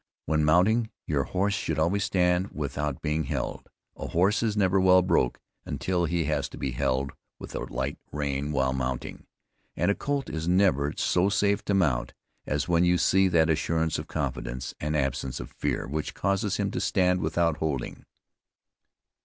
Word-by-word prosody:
When 75 Hz, 0 st, +1 dB
mounting, 105 Hz, +9 st, +3 dB, 0.2 s
your 70 Hz, -3 st, 0 dB
horse 100 Hz, +2 st, 0 dB
should 105 Hz, -, -2 dB
always 90 Hz, +6 st, +1 dB
stand 90 Hz, 0 st, +1 dB
without 75 Hz, -1 st, -3 dB
being 75 Hz, 0 st, 0 dB
held. -, -, -4 dB, 0.3 s
A -, -, -6 dB
horse 95 Hz, +6 st, +2 dB
is 110 Hz, -2 st, 0 dB
never 95 Hz, -1 st, +3 dB
well 90 Hz, 0 st, +6 dB
broke 80 Hz, -9 st, +1 dB, 0.2 s
when -, -, -5 dB, 0.3 s
he 85 Hz, -1 st, +1 dB
has 75 Hz, -1 st, -1 dB
to -, -, -10 dB
be 65 Hz, -, -2 dB
held 65 Hz, +3 st, 0 dB, 0.3 s
with -, -, -9 dB
a -, -, -3 dB
tight 65 Hz, +4 st, -3 dB
rein 70 Hz, 0 st, -2 dB
while 65 Hz, -2 st, +1 dB
mounting; 65 Hz, -1 st, -4 dB, 0.5 s
and -, -, +2 dB
a -, -, +3 dB
colt 140 Hz, +3 st, -2 dB
is 80 Hz, +1 st, -4 dB
never 90 Hz, -6 st, +3 dB
so 90 Hz, +2 st, +2 dB
safe 100 Hz, +1 st, +1 dB
to 100 Hz, -, +1 dB
mount, 65 Hz, -10 st, +1 dB, 0.3 s
as 75 Hz, 0 st, -1 dB
when 85 Hz, 0 st, +3 dB
you 90 Hz, 0 st, +4 dB
see 95 Hz, +2 st, +4 dB
that 80 Hz, -2 st, +3 dB
assurance 80 Hz, 0 st, 0 dB
of -, -, -6 dB
confidence, 60 Hz, +2 st, -4 dB
and 75 Hz, +1 st, -1 dB
absence 65 Hz, -1 st, -2 dB
of -, -, -8 dB
fear, -, -, -2 dB
which 75 Hz, +3 st, -4 dB
causes 100 Hz, +1 st, 0 dB
him -, -, -1 dB
to -, -, -2 dB
stand 90 Hz, -1 st, +2 dB
without 80 Hz, 0 st, +1 dB
holding. 75 Hz, -6 st, -3 dB
80 Hz, 175 wpm, -27 LUFS, 70-95 Hz, 0.5 s, well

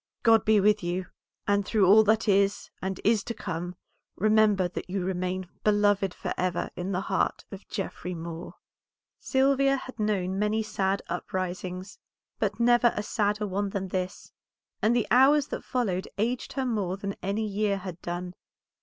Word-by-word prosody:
God 225 Hz, -2 st, +5 dB
be 215 Hz, -1 st, +5 dB
with 210 Hz, +1 st, +3 dB
you, 180 Hz, +1 st, -2 dB, 0.4 s
and 205 Hz, 0 st, +3 dB
through 205 Hz, 0 st, +2 dB
all 210 Hz, +4 st, +7 dB
that 220 Hz, +1 st, +2 dB
is 200 Hz, 0 st, +2 dB
and 190 Hz, 0 st, -3 dB
is 215 Hz, -1 st, +3 dB
to 230 Hz, -, -4 dB
come, 175 Hz, -3 st, -4 dB, 0.4 s
remember 210 Hz, -2 st, +3 dB
that 180 Hz, -, -7 dB
you 190 Hz, 0 st, -2 dB
remain 185 Hz, 0 st, -2 dB, 0.2 s
beloved 205 Hz, -2 st, +3 dB
forever 180 Hz, 0 st, -2 dB
in 180 Hz, +2 st, -3 dB
the 185 Hz, 0 st, 0 dB
heart 195 Hz, 0 st, -1 dB
of 195 Hz, 0 st, -10 dB
Geoffrey 185 Hz, -3 st, -4 dB
Moor." 165 Hz, +1 st, -7 dB, 0.6 s
Sylvia 275 Hz, 0 st, +3 dB
had 255 Hz, -2 st, -8 dB
known 195 Hz, -3 st, 0 dB
many 210 Hz, +1 st, +1 dB
sad 195 Hz, -2 st, -1 dB
uprisings, 185 Hz, +1 st, -4 dB, 0.4 s
but -, -, -1 dB
never 240 Hz, 0 st, +5 dB
a 210 Hz, -, -2 dB
sadder 210 Hz, 0 st, 0 dB
one 200 Hz, +1 st, -1 dB
than 195 Hz, -1 st, -3 dB
this, 185 Hz, 0 st, -4 dB, 0.5 s
and 225 Hz, +3 st, +3 dB
the 235 Hz, -, +2 dB
hours 275 Hz, +4 st, +5 dB
that -, -, -5 dB
followed 200 Hz, -8 st, -1 dB
aged 235 Hz, +4 st, -1 dB
her 265 Hz, -2 st, -1 dB
more 200 Hz, -6 st, -1 dB
than 200 Hz, 0 st, -4 dB
any 200 Hz, +4 st, -1 dB
year 205 Hz, -1 st, 0 dB
had 185 Hz, -3 st, -7 dB
done. 175 Hz, +1 st, -4 dB
200 Hz, 165 wpm, -27 LUFS, 185-215 Hz, 0.6 s, all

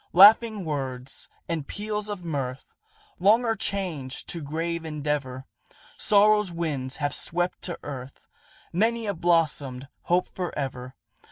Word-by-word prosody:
"Laughing 210 Hz, +1 st, +7 dB
words 135 Hz, -3 st, -3 dB, 0.2 s
and 160 Hz, -4 st, -3 dB
peals 210 Hz, 0 st, -3 dB
of 195 Hz, -4 st, -5 dB
mirth, 135 Hz, -5 st, -3 dB, 0.5 s
Long 220 Hz, +6 st, +5 dB
are 225 Hz, -1 st, +1 dB
changed 175 Hz, -11 st, -3 dB
to 170 Hz, -, -3 dB
grave 165 Hz, +3 st, -3 dB
endeavor; 145 Hz, -4 st, -3 dB, 0.5 s
Sorrow's 210 Hz, -1 st, +4 dB
winds 145 Hz, -6 st, -2 dB
have 145 Hz, -1 st, -1 dB
swept 175 Hz, +2 st, 0 dB
to 175 Hz, -, -2 dB
earth 135 Hz, -2 st, -7 dB, 0.5 s
Many 225 Hz, +5 st, +1 dB
a 200 Hz, -, 0 dB
blossomed 150 Hz, -6 st, +1 dB, 0.2 s
hope 180 Hz, +1 st, +2 dB
forever. 135 Hz, -7 st, -4 dB
165 Hz, 120 wpm, -26 LUFS, 140-200 Hz, 0.5 s, Laughing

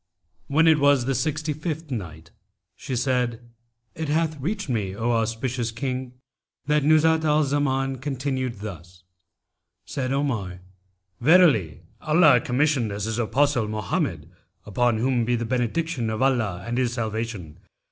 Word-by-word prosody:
When 155 Hz, +4 st, +3 dB
it 160 Hz, -2 st, +5 dB
was 140 Hz, -3 st, +4 dB
the 135 Hz, -, 0 dB
Sixty 150 Hz, +4 st, -1 dB
fifth 155 Hz, 0 st, -5 dB
Night, 80 Hz, -8 st, -6 dB, 0.4 s
She 130 Hz, -, -5 dB
said, 125 Hz, -2 st, 0 dB, 0.5 s
It 160 Hz, -2 st, -4 dB
hath 155 Hz, 0 st, 0 dB
reached 190 Hz, +8 st, -3 dB
me, 105 Hz, -7 st, -2 dB
O 115 Hz, +3 st, -1 dB
auspicious 115 Hz, +1 st, -1 dB
King, 130 Hz, +1 st, -4 dB, 0.5 s
that 150 Hz, 0 st, +2 dB
Nuzhat 160 Hz, +1 st, +4 dB
al 155 Hz, 0 st, +3 dB
Zaman 135 Hz, -2 st, 0 dB
continued 130 Hz, -4 st, -3 dB
thus, 90 Hz, -3 st, -9 dB, 0.8 s
"Said 130 Hz, -2 st, -3 dB
Omar, 115 Hz, -11 st, -2 dB, 0.6 s
'Verily 135 Hz, -, +4 dB, 0.2 s
Allah 155 Hz, -6 st, +5 dB
commissioned 130 Hz, -3 st, +1 dB
as 100 Hz, 0 st, -3 dB
His 110 Hz, +1 st, -2 dB
Apostle 125 Hz, 0 st, +1 dB
Mohammed 105 Hz, -3 st, -3 dB, 0.3 s
(upon 120 Hz, +2 st, +1 dB
whom 125 Hz, +1 st, +1 dB
be 120 Hz, +1 st, +1 dB
the 120 Hz, 0 st, -2 dB
benediction 125 Hz, +2 st, -1 dB
of 110 Hz, +3 st, -1 dB
Allah 110 Hz, -9 st, 0 dB
and 120 Hz, +2 st, -2 dB
His 125 Hz, -2 st, 0 dB
salvation!) 110 Hz, -8 st, -4 dB
125 Hz, 135 wpm, -24 LUFS, 110-145 Hz, 0.8 s, it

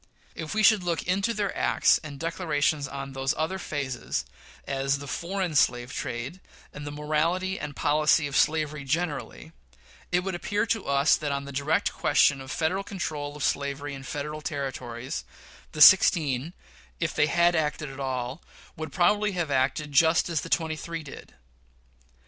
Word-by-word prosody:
If 160 Hz, +6 st, -6 dB
we 215 Hz, -, +2 dB
should 215 Hz, -2 st, +6 dB
look 175 Hz, -2 st, -1 dB
into 195 Hz, +5 st, 0 dB
their 205 Hz, -3 st, -2 dB
acts -, -, +3 dB
and 145 Hz, -3 st, -8 dB
declarations 155 Hz, -4 st, 0 dB
on 135 Hz, 0 st, -6 dB
those 135 Hz, 0 st, -1 dB
other 165 Hz, +5 st, -1 dB
phases, 135 Hz, -, -3 dB, 0.4 s
as 135 Hz, 0 st, 0 dB
the 140 Hz, -, -8 dB
foreign 180 Hz, +3 st, -3 dB
slave 120 Hz, -3 st, +2 dB
trade, 125 Hz, +9 st, -4 dB, 0.3 s
and 145 Hz, 0 st, -7 dB
the -, -, -4 dB
morality 160 Hz, +6 st, -1 dB
and 145 Hz, -, -6 dB
policy 150 Hz, +1 st, +3 dB
of 140 Hz, -2 st, -4 dB
slavery 150 Hz, -2 st, +1 dB
generally, 145 Hz, -1 st, -3 dB, 0.6 s
it 180 Hz, 0 st, +3 dB
would 190 Hz, +1 st, -3 dB
appear 205 Hz, +4 st, -1 dB
to 225 Hz, -3 st, -1 dB
us 140 Hz, +2 st, +4 dB
that 150 Hz, -2 st, -3 dB
on 140 Hz, 0 st, -2 dB
the 140 Hz, -, -7 dB
direct 140 Hz, +3 st, 0 dB
question 140 Hz, -2 st, +3 dB
of 130 Hz, -, -10 dB
Federal 170 Hz, +6 st, -1 dB
control 150 Hz, -7 st, -4 dB
of 150 Hz, -, -5 dB
slavery 140 Hz, 0 st, -1 dB
in 135 Hz, -, -7 dB
Federal 150 Hz, +3 st, -5 dB
Territories, 130 Hz, -5 st, -4 dB, 0.5 s
the 150 Hz, -, -4 dB
sixteen, 155 Hz, -5 st, +5 dB, 0.5 s
if 170 Hz, -1 st, -1 dB
they 150 Hz, -, +3 dB
had 170 Hz, +3 st, +3 dB
acted 150 Hz, -1 st, -1 dB
at 135 Hz, -, -10 dB
all, 130 Hz, +1 st, -3 dB, 0.3 s
would 155 Hz, 0 st, -6 dB
probably 205 Hz, +3 st, +2 dB
have 170 Hz, -5 st, -2 dB
acted 140 Hz, +3 st, 0 dB
just 160 Hz, +4 st, +4 dB
as 165 Hz, -3 st, 0 dB
the -, -, -8 dB
twenty 160 Hz, -2 st, 0 dB
three 165 Hz, +1 st, -6 dB
did. 140 Hz, -, -11 dB
150 Hz, 165 wpm, -27 LUFS, 140-170 Hz, 0.6 s, should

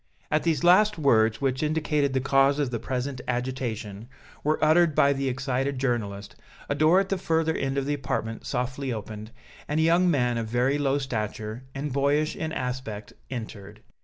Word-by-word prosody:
As 155 Hz, -, +3 dB
these 160 Hz, -5 st, 0 dB
last 205 Hz, +4 st, +5 dB
words, 115 Hz, -6 st, +3 dB
which 130 Hz, -1 st, 0 dB
indicated 150 Hz, -2 st, 0 dB
the 130 Hz, -, +2 dB
cause 135 Hz, +1 st, +3 dB
of 140 Hz, -4 st, -1 dB
the 115 Hz, -, -2 dB
present 130 Hz, +1 st, -3 dB
agitation, 120 Hz, -4 st, -3 dB, 0.4 s
were 155 Hz, +1 st, +2 dB
uttered 160 Hz, 0 st, +4 dB
by 140 Hz, 0 st, +4 dB
the 135 Hz, -1 st, -1 dB
excited 135 Hz, +1 st, -1 dB
journalist 105 Hz, -6 st, -2 dB, 0.3 s
a -, -, 0 dB
door 155 Hz, +5 st, +4 dB
at 195 Hz, 0 st, -1 dB
the 195 Hz, -, -1 dB
further 160 Hz, -2 st, +1 dB
end 135 Hz, 0 st, -2 dB
of 135 Hz, -, 0 dB
the 145 Hz, -, 0 dB
apartment 120 Hz, -5 st, -3 dB
softly 130 Hz, +1 st, -2 dB
opened, 110 Hz, -1 st, -6 dB, 0.4 s
and 150 Hz, +2 st, 0 dB
a -, -, +3 dB
young 170 Hz, +2 st, +4 dB
man 125 Hz, -6 st, +1 dB
of 115 Hz, -, -3 dB
very 125 Hz, +5 st, +1 dB
low 140 Hz, -1 st, +1 dB
stature 110 Hz, -2 st, -4 dB
and 140 Hz, 0 st, -3 dB
boyish 145 Hz, +3 st, +1 dB
in 160 Hz, 0 st, -4 dB
aspect 125 Hz, -6 st, -5 dB, 0.2 s
entered. 110 Hz, -6 st, -8 dB
135 Hz, 180 wpm, -26 LUFS, 120-150 Hz, 0.4 s, last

